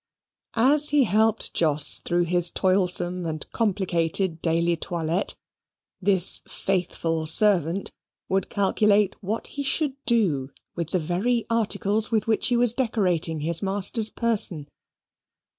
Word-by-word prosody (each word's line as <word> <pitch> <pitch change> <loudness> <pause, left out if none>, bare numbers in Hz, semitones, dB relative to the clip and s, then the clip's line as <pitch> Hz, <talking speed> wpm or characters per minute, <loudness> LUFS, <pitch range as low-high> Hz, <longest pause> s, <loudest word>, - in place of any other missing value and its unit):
As 290 +6 +4
he 295 -2 +3
helped 220 +1 +1
Jos 150 -3 +2
through 175 0 -1
his 175 0 +1
toilsome 180 -2 0
and 155 -1 -4
complicated 180 -4 -1
daily 170 +1 +1
toilette, 170 +2 -3 0.7
this 190 -2 +3
faithful 165 -4 -2
servant 185 0 +2 0.4
would 190 -1 -1
calculate 205 0 +1
what 215 +3 -4
he 285 - -6
should 280 +1 0
do 175 - +1 0.3
with 170 -2 -4
the 185 - 0
very 190 +9 -1
articles 220 -1 0
with 220 -3 0
which 225 -1 +1
he 245 - +1
was 240 -1 +4
decorating 180 - 0
his 165 +2 +2
master's 205 +3 -1
person. 200 -10 -1
190 Hz, 125 wpm, -24 LUFS, 170-220 Hz, 0.7 s, As